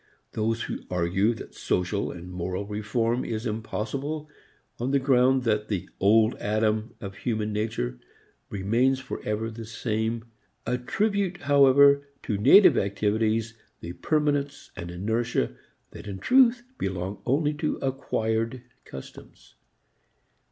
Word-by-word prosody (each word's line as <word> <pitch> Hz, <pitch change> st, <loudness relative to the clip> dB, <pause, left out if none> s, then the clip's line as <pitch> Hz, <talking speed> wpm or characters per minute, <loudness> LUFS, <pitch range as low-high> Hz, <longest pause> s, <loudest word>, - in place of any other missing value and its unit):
Those 110 Hz, +1 st, -1 dB
who -, -, -4 dB
argue 95 Hz, +6 st, +1 dB
that -, -, -10 dB
social 90 Hz, +3 st, -1 dB
and 90 Hz, +1 st, -8 dB
moral 90 Hz, +2 st, -3 dB
reform 110 Hz, +4 st, -1 dB
is 110 Hz, +1 st, -4 dB
impossible 125 Hz, +7 st, -3 dB, 0.5 s
on 120 Hz, +2 st, -1 dB
the 140 Hz, -, +3 dB
ground 130 Hz, -1 st, +3 dB
that 105 Hz, -2 st, 0 dB
the 100 Hz, -5 st, -3 dB
Old 110 Hz, +4 st, +4 dB
Adam 110 Hz, +2 st, 0 dB
of 100 Hz, 0 st, -8 dB
human 110 Hz, -2 st, -2 dB
nature 105 Hz, -, -2 dB, 0.5 s
remains 115 Hz, +7 st, +1 dB
forever 110 Hz, -3 st, -4 dB
the 115 Hz, +1 st, -8 dB
same, 110 Hz, 0 st, -2 dB, 0.4 s
attribute 185 Hz, -, -1 dB
however 140 Hz, 0 st, +6 dB, 0.2 s
to 110 Hz, -, -1 dB
native 180 Hz, -, +7 dB
activities 110 Hz, +3 st, 0 dB, 0.3 s
the 85 Hz, -, -6 dB
permanence 145 Hz, -, -1 dB
and 85 Hz, -, -6 dB
inertia 110 Hz, -, -1 dB, 0.4 s
that -, -, -10 dB
in 100 Hz, -2 st, -5 dB
truth 245 Hz, -, +4 dB, 0.2 s
belong 95 Hz, +1 st, -3 dB
only 145 Hz, +3 st, +2 dB
to 155 Hz, +1 st, -1 dB
acquired 115 Hz, -3 st, -2 dB, 0.2 s
customs. 65 Hz, -, -12 dB
115 Hz, 120 wpm, -26 LUFS, 105-135 Hz, 0.5 s, native